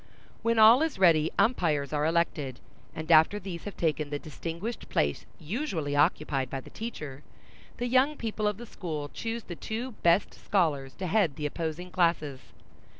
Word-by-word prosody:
When 230 Hz, 0 st, +1 dB
all 225 Hz, +5 st, +8 dB
is 320 Hz, -7 st, 0 dB
ready, 165 Hz, -4 st, +5 dB
umpires 155 Hz, -, +1 dB
are 150 Hz, +1 st, +1 dB
elected, 160 Hz, -6 st, 0 dB, 0.4 s
and 160 Hz, +1 st, -3 dB
after 160 Hz, +5 st, +6 dB
these 180 Hz, -4 st, -7 dB
have 205 Hz, -, -7 dB
taken 155 Hz, -2 st, 0 dB
the 145 Hz, -, -2 dB
distinguished 170 Hz, -, -6 dB
place 70 Hz, -1 st, 0 dB
usually 165 Hz, -, -3 dB
occupied 145 Hz, -3 st, +1 dB
by 135 Hz, -, -3 dB
the -, -, -13 dB
teacher, 150 Hz, -, -6 dB, 0.6 s
the 245 Hz, -, -2 dB
young 260 Hz, +4 st, +3 dB
people 215 Hz, -2 st, -2 dB
of 210 Hz, -1 st, -1 dB
the 240 Hz, -, -8 dB
school 155 Hz, -9 st, -5 dB
choose 230 Hz, 0 st, -4 dB
the 175 Hz, -, -7 dB
two 230 Hz, +8 st, -4 dB
best 170 Hz, +3 st, +3 dB
scholars 145 Hz, -9 st, 0 dB
to 190 Hz, -, -5 dB
head 180 Hz, -5 st, +2 dB
the 150 Hz, -, -4 dB
opposing 165 Hz, +3 st, -4 dB
classes. 160 Hz, -5 st, +1 dB
170 Hz, 165 wpm, -28 LUFS, 150-215 Hz, 0.6 s, all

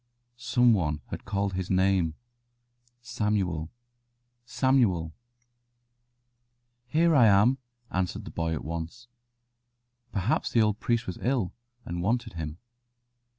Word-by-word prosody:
Some 120 Hz, 0 st, +3 dB
one 75 Hz, -7 st, 0 dB
had -, -, -6 dB
called 100 Hz, -1 st, -1 dB
his 95 Hz, -1 st, -3 dB
name: 95 Hz, -4 st, +2 dB, 0.9 s
"Samuel, 105 Hz, -9 st, -1 dB, 0.8 s
Samuel." 115 Hz, -, +2 dB, 1.7 s
"Here 165 Hz, +5 st, +3 dB
am 120 Hz, 0 st, +5 dB, 0.3 s
I," -, -, -3 dB
answered 90 Hz, -1 st, -2 dB
the -, -, -8 dB
boy 80 Hz, -1 st, -1 dB
at 75 Hz, -, -6 dB
once. 85 Hz, +9 st, -6 dB, 1.0 s
Perhaps 100 Hz, +4 st, 0 dB
the 115 Hz, -, +5 dB
old 105 Hz, 0 st, 0 dB
priest 120 Hz, -1 st, 0 dB
was 90 Hz, -, -6 dB
ill, 120 Hz, -7 st, 0 dB, 0.3 s
and 85 Hz, 0 st, -4 dB
wanted 115 Hz, +3 st, 0 dB
him. 80 Hz, -1 st, -5 dB
100 Hz, 110 wpm, -28 LUFS, 85-120 Hz, 1.7 s, am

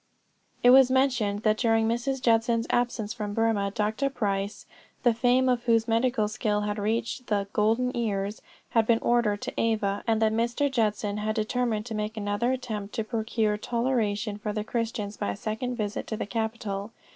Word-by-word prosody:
It 245 Hz, -, +8 dB
was 260 Hz, 0 st, +7 dB
mentioned 255 Hz, -6 st, +1 dB
that 215 Hz, -1 st, +2 dB
during 225 Hz, -2 st, +3 dB
Mrs. 250 Hz, +3 st, -1 dB
Judson's 230 Hz, -1 st, +2 dB
absence 235 Hz, -3 st, 0 dB
from 210 Hz, -3 st, -4 dB
Burmah, 225 Hz, -3 st, +1 dB
Dr. 215 Hz, +7 st, -1 dB
Price, 200 Hz, -5 st, -2 dB, 0.4 s
the 240 Hz, -, +5 dB
fame 245 Hz, +3 st, +3 dB
of 245 Hz, -1 st, +1 dB
whose 230 Hz, -1 st, +3 dB
medical 230 Hz, -1 st, +2 dB
skill 210 Hz, 0 st, -1 dB
had 210 Hz, 0 st, -2 dB
reached 225 Hz, +4 st, -2 dB
the 200 Hz, -2 st, 0 dB
'golden 230 Hz, +4 st, +1 dB
ears,' 205 Hz, -3 st, -2 dB, 0.3 s
had 225 Hz, -2 st, +3 dB
been 230 Hz, -, +5 dB
ordered 230 Hz, -3 st, +1 dB
to -, -, -4 dB
Ava, 215 Hz, -3 st, 0 dB
and 225 Hz, -1 st, +2 dB
that 220 Hz, -1 st, +2 dB
Mr. 240 Hz, +5 st, 0 dB
Judson 210 Hz, -4 st, 0 dB
had 215 Hz, +1 st, -2 dB
determined 220 Hz, 0 st, -1 dB
to 235 Hz, -, -6 dB
make 215 Hz, +1 st, -3 dB
another 205 Hz, +4 st, 0 dB
attempt 220 Hz, -6 st, -4 dB
to 225 Hz, -, -1 dB
procure 220 Hz, -1 st, -1 dB
toleration 220 Hz, -3 st, -1 dB
for 210 Hz, 0 st, -3 dB
the 210 Hz, 0 st, -2 dB
Christians 220 Hz, -3 st, -3 dB
by -, -, -2 dB
a 100 Hz, -, -2 dB
second 225 Hz, -, -3 dB
visit 210 Hz, -3 st, -3 dB
to 220 Hz, -, -3 dB
the -, -, -3 dB
capital. 220 Hz, -2 st, -3 dB
225 Hz, 180 wpm, -27 LUFS, 210-240 Hz, 0.4 s, It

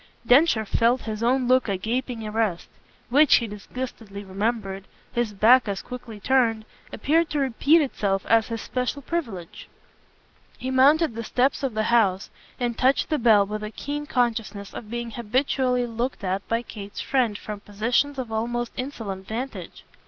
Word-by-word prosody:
Densher 245 Hz, -3 st, +4 dB
felt 235 Hz, +4 st, +2 dB
his 215 Hz, -1 st, -5 dB
own 250 Hz, +2 st, +2 dB
look 255 Hz, -2 st, +3 dB
a 195 Hz, -, 0 dB
gaping 235 Hz, +2 st, -3 dB
arrest 210 Hz, -5 st, -1 dB, 0.4 s
which, 290 Hz, +3 st, +6 dB
he 235 Hz, -, +2 dB
disgustedly 210 Hz, -1 st, -7 dB
remembered, 195 Hz, 0 st, -3 dB, 0.3 s
his 240 Hz, -3 st, 0 dB
back 230 Hz, +5 st, +5 dB
as 200 Hz, -1 st, -3 dB
quickly 245 Hz, -4 st, -8 dB
turned, 225 Hz, -2 st, +2 dB, 0.3 s
appeared 315 Hz, +8 st, +1 dB
to 300 Hz, -, -2 dB
repeat 280 Hz, +5 st, +3 dB
itself 200 Hz, -7 st, -1 dB
as 225 Hz, -1 st, +3 dB
his 230 Hz, -1 st, -4 dB
special 255 Hz, +3 st, -3 dB
privilege. 230 Hz, -, -5 dB, 0.9 s
He 260 Hz, -, -4 dB
mounted 280 Hz, +2 st, +4 dB
the 230 Hz, +1 st, -5 dB
steps 255 Hz, +4 st, +1 dB
of 265 Hz, -5 st, -2 dB
the 215 Hz, -, +1 dB
house 200 Hz, -4 st, +2 dB, 0.3 s
and 240 Hz, -2 st, -1 dB
touched 260 Hz, +3 st, +2 dB
the 305 Hz, -, +1 dB
bell 220 Hz, -4 st, +5 dB
with 210 Hz, +1 st, -5 dB
a 215 Hz, -, -4 dB
keen 290 Hz, +6 st, -5 dB
consciousness 225 Hz, -7 st, -1 dB
of 215 Hz, -, -8 dB
being 235 Hz, 0 st, -4 dB
habitually 250 Hz, +2 st, 0 dB
looked 235 Hz, 0 st, -3 dB
at 190 Hz, +1 st, -2 dB
by 230 Hz, +1 st, 0 dB
Kate's 205 Hz, -4 st, -9 dB
friend 245 Hz, -6 st, +1 dB
from 210 Hz, -1 st, -7 dB
positions 235 Hz, +8 st, 0 dB
of 250 Hz, -4 st, -4 dB
almost 240 Hz, +2 st, -2 dB
insolent 220 Hz, -8 st, -5 dB
vantage. 245 Hz, +5 st, -6 dB
235 Hz, 160 wpm, -24 LUFS, 210-255 Hz, 0.9 s, which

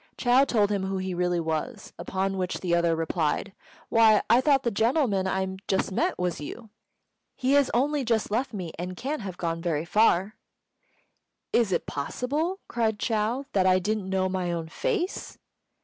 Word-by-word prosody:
Chou 250 Hz, +2 st, +4 dB
told 210 Hz, -4 st, +2 dB
him 195 Hz, -2 st, 0 dB
who 195 Hz, 0 st, -2 dB
he 185 Hz, 0 st, -3 dB
really 180 Hz, 0 st, 0 dB
was; 165 Hz, +8 st, -3 dB
upon 195 Hz, 0 st, -2 dB
which 185 Hz, -1 st, -2 dB
the 175 Hz, -2 st, -1 dB
other 170 Hz, -1 st, +3 dB
replied, 165 Hz, +3 st, -1 dB, 0.4 s
"Why, 220 Hz, -2 st, +5 dB
I 240 Hz, -, +6 dB
thought 275 Hz, -1 st, +3 dB
the 235 Hz, -, 0 dB
gentleman 220 Hz, -3 st, +1 dB
I 190 Hz, 0 st, -2 dB
just 190 Hz, +1 st, 0 dB
met -, -, 0 dB
was 180 Hz, -3 st, -2 dB
you! 220 Hz, +8 st, -8 dB, 0.6 s
He 255 Hz, +1 st, 0 dB
has 285 Hz, -2 st, +4 dB
only 285 Hz, +3 st, +1 dB
just 225 Hz, -3 st, 0 dB
left 245 Hz, +4 st, 0 dB
me, 185 Hz, -7 st, -5 dB
and 180 Hz, +1 st, -5 dB
can't 285 Hz, +2 st, -3 dB
have 190 Hz, -3 st, -6 dB
got 165 Hz, -2 st, -2 dB
very 165 Hz, -2 st, -1 dB
far." 205 Hz, +1 st, +2 dB, 1.2 s
"Is 230 Hz, -5 st, +3 dB
it 175 Hz, -, 0 dB
possible," 290 Hz, -, -2 dB
cried 225 Hz, -2 st, 0 dB
Chou, 225 Hz, +5 st, -1 dB
"that 190 Hz, -2 st, +3 dB
I 185 Hz, 0 st, +5 dB
didn't 200 Hz, +1 st, -2 dB
know 190 Hz, -1 st, +1 dB
my 185 Hz, -2 st, -2 dB
own 165 Hz, -1 st, -4 dB
face?" 410 Hz, -, -2 dB
195 Hz, 175 wpm, -26 LUFS, 180-240 Hz, 1.2 s, I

